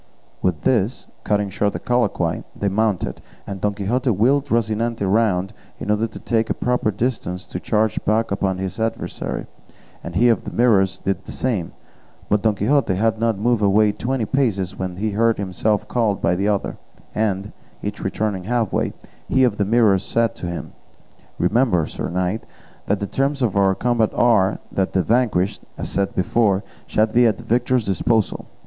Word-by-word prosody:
With 90 -5 0
this, 115 -1 +1 0.2
cutting 105 -1 0
short 100 +1 0
the - - -4
colloquy, 105 -9 0
they 100 - -1
mounted, 105 -1 0 0.2
and 95 -2 -6
Don 105 0 0
Quixote 120 +6 0
wheeled 125 +7 +2
Rocinante 115 -1 0
round 100 -1 +1 0.3
in 105 - -2
order 105 +2 +1
to - - -11
take 115 -1 0
a - - 0
proper 125 -3 0
distance 105 -4 -2
to 90 - -6
charge 110 +2 0
back 110 +1 +1
upon 95 -1 0
his 95 +1 -4
adversary, 115 0 -3 0.6
and 85 - -7
he 120 +6 +4
of 115 - +2
the - - -6
Mirrors 100 -6 +3
did 95 - -2
the - - -8
same; 110 -10 -2 0.6
but 105 0 +2
Don 110 -1 +2
Quixote 105 0 +2
had 110 +3 +1
not 115 -2 +1
moved 115 +2 +1
away 105 +1 +4
twenty 120 +2 -2
paces 100 -7 0
when 95 -1 -4
he 105 +3 -2
heard 115 +2 +2
himself 100 +2 -1
called 110 -5 0
by - - +2
the 100 +3 0
other, 105 -2 -1 0.4
and, 100 -2 -1 0.3
each 105 0 -4
returning 95 -1 -2
half 115 -1 0
way, - - 0 0.4
he 130 - +3
of 115 -5 +2
the 100 - +1
Mirrors 105 -3 +3
said 115 +2 +1
to 90 - -5
him, 85 0 -5 0.6
"Remember, 90 -2 +2
sir - - -5
knight, 90 +5 -2 0.4
that 100 0 +1
the - - 0
terms 135 +4 -1
of 110 -5 0
our 95 -1 +3
combat 115 +1 +1
are, 105 -5 +3
that 95 -1 -1
the 95 - +2
vanquished, 110 -5 +1 0.2
as - - -4
I - - -2
said - - -15
before, 100 0 +2 0.2
shall 110 - +3
be 120 +2 +4
at 105 -4 +1
the - - -10
victor's 125 0 +1
disposal." 105 +2 0
105 Hz, 180 wpm, -21 LUFS, 95-115 Hz, 0.6 s, he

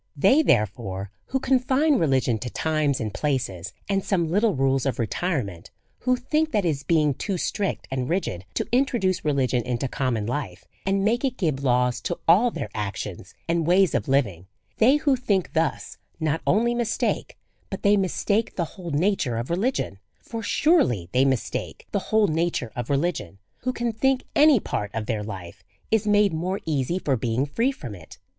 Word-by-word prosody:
They, 200 - +5
therefore, 100 - 0
who 265 - -1
confine 265 +2 +2
religion 130 -6 +2
to 125 - -5
times 155 -1 0
and 110 -2 -3
places, 120 - -2 0.2
and 195 -1 0
some 170 -5 0
little 205 +1 +2
rules 135 0 +1
of 130 - -1
re 115 - +1
tirement, 115 - -3 0.3
who 255 0 +2
think 305 +5 0
that 205 -3 +2
it - - +3
is 140 -3 -2
being 155 -3 +2
too 190 +7 -3
strict 195 +3 -2
and 130 -1 -2
rigid 165 - -2
to - - 0
introduce 240 -7 +1
religion 135 -4 +1
into 125 +2 -2
common 125 -5 -1
life, 115 -7 -4 0.2
and 195 0 +1
make 235 +4 +1
it 260 -2 -1
give 150 -7 -1
laws 125 -1 +2
to 175 - -3
all 200 +9 +6
their 105 - -5
actions 100 -2 -5
and 165 -1 0
ways 185 0 +4
of - - 0
living, 100 -11 0 0.3
they 250 +6 +6
who 295 -2 +2
think 205 -8 -1
thus 160 -1 -1 0.2
not 160 0 0
only 235 +4 +3
mistake, 240 -2 -1 0.3
but - - -6
they 205 0 +5
mistake 200 +3 0
the 170 - 0
whole 180 -4 -7
nature 150 - +1
of 120 +7 -4
religion; 185 - -1 0.2
for 230 -1 -6
surely 205 - +2
they 130 +2 +3
mistake 130 -4 -2
the 200 - +1
whole 220 -1 +4
nature 160 - -1
of 120 -1 -4
religion 145 - -1 0.2
who 255 - -1
can 240 -1 -2
think 265 +4 +1
any 295 -4 +6
part 105 - -3
of 110 -1 -2
their 110 -2 -2
life 95 -5 -8 0.3
is 220 -1 +2
made 205 -3 +4
more 180 +5 -2
easy 155 +2 0
for 150 -7 0
being 120 +2 0
free 230 - 0
from 125 - -8
it. 85 -5 -12
160 Hz, 180 wpm, -24 LUFS, -, 0.3 s, all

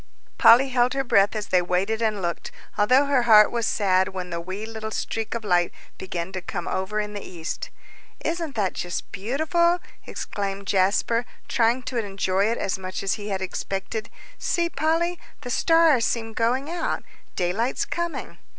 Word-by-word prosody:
Polly 255 +4 +7
held 250 -1 +2
her 270 - +1
breath 200 -4 +3
as 210 -1 -4
they 180 - +4
waited 190 +5 0
and 215 -4 0
looked, 170 0 -3 0.3
although 255 +7 +4
her 280 -3 +3
heart 215 -1 +8
was 235 -1 0
sad 190 -2 +2
when 185 -1 -6
the 170 0 -3
wee 190 +5 -5
little 220 -1 -6
streak 225 +1 -3
of 230 - -4
light 175 -4 +2 0.3
began 180 -1 -4
to 185 -1 -4
come 175 0 -5
over 190 +3 -1
in 210 0 -3
the 205 - -5
east. 170 -4 -6 0.6
"Isn't 330 -3 -2
that 200 -4 0
just 175 0 -4
beautiful!" 315 - +1 0.3
exclaimed 200 -1 -4
Jasper, 200 +5 +2 0.2
trying 245 -2 +2
to 250 - -4
enjoy 195 -1 0
it 230 +1 0
as 190 - -2
much 185 0 -5
as 195 - +1
he 210 0 -5
had 190 -1 -2
expected; 195 +4 -4 0.3
"see, 340 -1 0
Polly, 330 +4 0 0.2
the 245 - -6
stars 325 -4 +4
seem 225 +1 -1
going 250 +5 0
out 340 +1 -2 0.3
daylight's 195 +8 0
coming!" 340 -1 -4
215 Hz, 170 wpm, -24 LUFS, 190-250 Hz, 0.6 s, heart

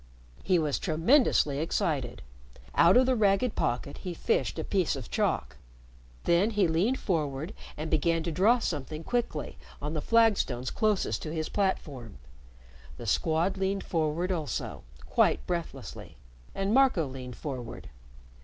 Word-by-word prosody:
He 185 - +2
was 150 -4 0
tremendously 165 - +3
excited. 150 -5 -1 0.5
Out 170 +7 +6
of 255 - +5
the 260 0 +2
ragged 210 +2 +2
pocket 120 +4 -2
he 180 -3 -5
fished 460 - 0
a - - -2
piece 185 -6 0
of 130 -5 -8
chalk. - - -1 0.7
Then 175 +5 +3
he 205 -5 +2
leaned 185 +11 +1
forward 155 -1 -2 0.2
and 155 +1 -4
began 165 +1 +2
to 170 - -2
draw 205 +9 +4
something 155 - -4
quickly 240 -10 -2 0.2
on 150 +2 -4
the 155 - -2
flagstones 205 - +2
closest 215 -3 0
to 155 - -5
his 160 -1 -3
platform. 145 - -2 0.8
The - - -8
Squad 165 +5 +1
leaned 195 +1 -1
forward 165 +2 -1
also, 160 -5 -3 0.2
quite - - +2
breathlessly, 170 -2 -5 0.4
and 195 +2 0
Marco 260 - +4
leaned 130 -2 -7
forward. 130 - -6
165 Hz, 140 wpm, -29 LUFS, 150-200 Hz, 0.8 s, Out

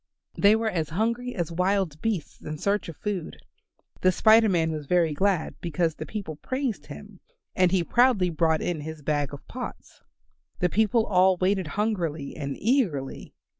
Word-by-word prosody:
They 205 +2 +5
were 225 0 0
as 160 -4 -2
hungry 235 +7 -1
as 170 -4 -2
wild 180 -3 0
beasts 215 -8 -3
in 155 0 -6
search 200 +3 -1
of 165 - -9
food. 200 -6 -4 0.6
The 185 - +5
Spider 220 +3 +5
Man 165 -3 +1
was 150 -2 -5
very 170 -2 +2
glad 190 +1 0
because 165 -1 0
the - - -8
people 195 -8 -5
praised 255 - -3
him, 195 +6 -11 0.4
and 185 -1 +3
he 185 -2 +2
proudly 235 -4 +3
brought 160 0 +1
in 170 -4 -2
his 155 0 -8
bag 145 -1 0
of 145 - -10
pots. 250 0 -8 0.6
The 180 - +1
people 220 +3 +2
all 185 -1 +4
waited 185 -1 +1
hungrily 170 -9 -1
and 140 -2 -4
eagerly. 200 - -1
180 Hz, 170 wpm, -26 LUFS, 160-210 Hz, 0.6 s, They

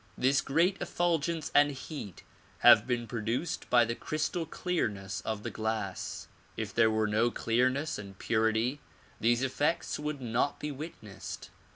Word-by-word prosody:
This 135 +2 +3
great 175 +7 +2
effulgence 170 -2 0
and 145 0 +6
heat 135 - -8 0.4
have 105 - +8
been 120 -2 0
produced 115 +7 -3
by 120 -1 +6
the 115 - -2
crystal 155 +5 -2
clearness 105 - -2
of 110 -1 -3
the - - -4
glass. 110 -3 -3 0.3
If - - -4
there 115 -1 +5
were 110 0 +1
no 110 +3 +2
clearness 130 +7 0
and 100 -2 -9
purity 110 +6 +1 0.4
these 120 +3 +2
effects 150 +6 0
would 150 -1 -3
not 125 +3 0
be 150 - -3
witnessed. 135 - -8
125 Hz, 145 wpm, -30 LUFS, 110-150 Hz, 0.4 s, have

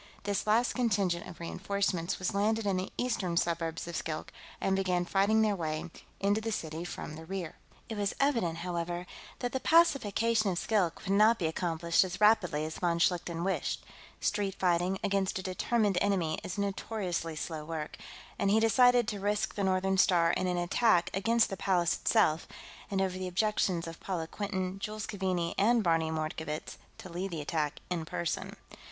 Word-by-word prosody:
This 205 +1 -1
last 230 +3 +3
contingent 195 -8 0
of 175 - -11
reenforcements 180 0 -1
was 185 - -2
landed 215 +2 +1
in 200 -2 +1
the 185 - -3
eastern 205 -9 -1
suburbs 165 -1 -1
of 170 - -5
Skilk 155 0 -4 0.3
and 195 - +1
began 180 -2 +1
fighting 205 +4 +3
their 210 -2 +2
way 155 -2 -3 0.3
into 205 +2 +2
the 225 0 -2
city 160 -4 -4
from 175 -3 -6
the 160 - -9
rear. 185 -3 -5 0.3
It 225 - -5
was 200 -1 0
evident, 230 - +1
however, 175 0 -3 0.4
that 245 -1 -1
the 265 - -1
pacification 230 - +3
of 180 - -1
Skilk 185 -5 0
would 195 - -3
not 215 +3 +5
be 175 - -2
accomplished 170 +1 +1
as 180 -1 -5
rapidly 195 -8 +4
as 155 - -6
von 170 -2 +1
Schlichten 170 -1 0
wished 190 +1 -1 0.4
street 200 -2 0
fighting, 180 +1 +1
against 195 -2 0
a 190 - -4
determined 200 +1 +1
enemy, 180 -6 +1
is 185 - -5
notoriously 195 -4 -2
slow 155 0 -4
work 155 -1 -5 0.4
and 200 - +2
he 215 +2 +5
decided 245 +1 +5
to 205 -3 -4
risk 205 +1 0
the 205 - -2
Northern 190 0 +1
Star 175 -3 +4
in 185 - 0
an 180 -1 0
attack 175 +1 +2
against 225 +4 +2
the 195 - -3
Palace 175 -3 +2
itself, 155 +2 +2 0.4
and, 195 -1 0
over 185 -1 -2
the 185 - -3
objections 185 -2 +1
of 165 0 -8
Paula 175 -4 -3
Quinton, 190 +1 -3
Jules 215 +1 -4
Keaveney, 185 -5 -1
and 230 +3 +4
Barney 165 -2 +2
Mordkovitz, 155 -1 -4 0.2
to - - -9
lead 180 +2 -4
the 165 -4 -4
attack 150 -1 -2
in 170 -2 -1
person. 170 +1 -3
185 Hz, 180 wpm, -31 LUFS, 170-205 Hz, 0.4 s, not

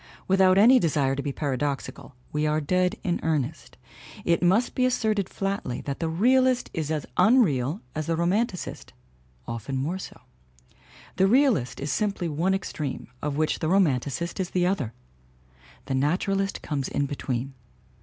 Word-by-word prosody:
Without 190 0 +4
any 245 +6 +7
desire 145 - +1
to 140 - -2
be 140 - -3
paradoxical 140 -1 -3 0.2
we 150 0 0
are 150 +1 +1
dead 180 +6 +1
in 175 -2 0
earnest 155 -2 -2 0.5
it 170 - +2
must 195 +7 +3
be 255 - 0
asserted 215 -6 +1
flatly 195 -10 -3
that 140 -1 -5
the 165 - -1
realist 255 +8 +2
is 155 -2 -3
as 155 -2 -2
unreal 180 - +3
as 155 -1 -4
the 165 - +1
roman 185 +8 +2
ticist. 180 - -8 0.5
Often 115 +4 -4
more 160 +8 -2
so. - - -9 1.0
The 190 - +4
realist 225 - +2
is 140 0 -3
simply 195 0 -1
one 170 +5 +1
ex 195 - -4
treme, 140 -6 -4
of 145 -1 -2
which 155 0 0
the 155 - -1
romanticist 170 -1 +1
is 185 -1 -1
the 180 -1 +1
other. 170 - -1 0.9
The - - -3
naturalist 195 +8 0
comes 140 -3 -2
in 140 - -1
between. 135 -2 -3
165 Hz, 160 wpm, -26 LUFS, 140-195 Hz, 1.0 s, any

